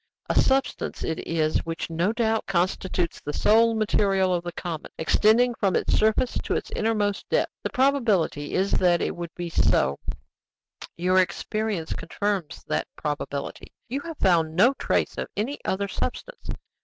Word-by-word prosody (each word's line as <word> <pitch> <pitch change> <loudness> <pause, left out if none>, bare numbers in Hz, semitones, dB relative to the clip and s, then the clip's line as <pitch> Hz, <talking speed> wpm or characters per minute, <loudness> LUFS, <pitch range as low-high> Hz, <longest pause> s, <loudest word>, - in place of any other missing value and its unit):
"A - - +4
substance 265 0 0
it 160 - -2
is 155 -2 +1
which 165 0 -4
no 170 +5 +1
doubt 225 -1 0
constitutes 180 -1 -1
the 150 - -5
sole 225 +5 +4
material 195 -3 +2
of 175 -1 -1
the 175 - -4
comet, 170 -3 -6
extending 220 +8 +4
from 195 -4 0
its - - +1
surface 220 +3 +2
to - - -2
its - - -3
innermost 210 -2 -1
depths. - - +1
The - - -2
probability 230 - +1
is 190 +2 +1
that 175 -2 +3
it - - -2
would 170 -1 -5
be 175 -1 -5
so; 70 - +2 1.0
your 185 +2 +3
experience 205 -1 -1
confirms 180 -1 -3
that - - -1
probability: 145 -1 -4 0.2
you 265 +4 -2
have 330 -1 -7
found 165 -4 +2
no 240 +9 +5
trace - - -1
of - - -3
any 245 +8 -3
other 200 +1 0
substance. - - -5
195 Hz, 155 wpm, -25 LUFS, 170-220 Hz, 1.0 s, no